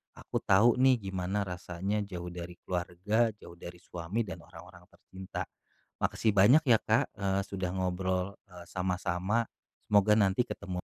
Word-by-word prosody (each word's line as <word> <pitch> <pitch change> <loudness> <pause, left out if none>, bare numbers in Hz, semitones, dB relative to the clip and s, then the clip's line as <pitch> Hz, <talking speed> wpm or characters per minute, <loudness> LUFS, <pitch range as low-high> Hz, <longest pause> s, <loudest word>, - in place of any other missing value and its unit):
aku - - -4
tahu 105 +5 +5
nih 130 -2 +5
gimana 95 +2 -1
rasanya 90 +3 -3
jauh 90 -3 -6
dari 90 0 -7
keluarga, 95 +6 0
jauh 85 - -12
dari 85 0 -9
suami, 90 +6 -3
dan 95 -1 -6
orang-orang 90 0 -14
tercinta. 95 0 -7 0.6
Makasih 110 - +1
banyak 125 +11 +6
ya 115 -2 +6
Kak, 110 +1 +1
eee, 100 -1 0
sudah 95 -2 -3
ngobrol, 95 +1 -1 0.2
eee, 90 -1 -11
sama-sama, 90 +4 -1 0.4
semoga 105 0 +5
nanti 100 +3 +3
ketemu. 90 -2 -5
95 Hz, 145 wpm, -30 LUFS, 90-105 Hz, 0.6 s, banyak